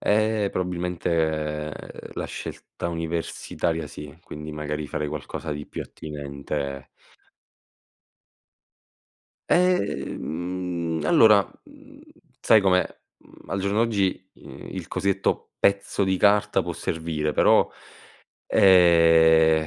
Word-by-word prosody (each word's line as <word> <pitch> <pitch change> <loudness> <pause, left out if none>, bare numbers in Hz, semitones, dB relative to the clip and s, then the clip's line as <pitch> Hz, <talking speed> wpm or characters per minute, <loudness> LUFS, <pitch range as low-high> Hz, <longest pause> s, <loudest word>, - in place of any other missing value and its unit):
Eh, 110 0 +2
probabilmente 80 -4 -2 0.4
la - - -3
scelta - - -7
universitaria 80 -1 -3
sì, 75 +1 -10
quindi 75 +1 -8
magari 75 0 -4
farei 75 +2 -3
qualcosa 75 +1 -6
di 75 0 -5
più - - -6
attinente 70 -2 -6 2.6
Ehm 90 - -1
mhmm, 75 - -3
allora, 105 +3 +6 0.2
mhmm, 285 -1 -17 0.4
sai 110 -3 +5
com'è, 95 -2 +3 0.3
mhmm, - - -20
al 95 - -2
giorno 100 +2 0
d'oggi, 100 -4 -1
i - - -11
il 90 -3 -6
cosiddetto: 95 +1 -1
pezzo 100 0 +1
di 95 -1 0
carta 105 +1 +3
può - - -5
servire, 80 -2 -2
però - - +4 0.8
ehm, 80 -3 +5
85 Hz, 100 wpm, -24 LUFS, 75-100 Hz, 2.6 s, allora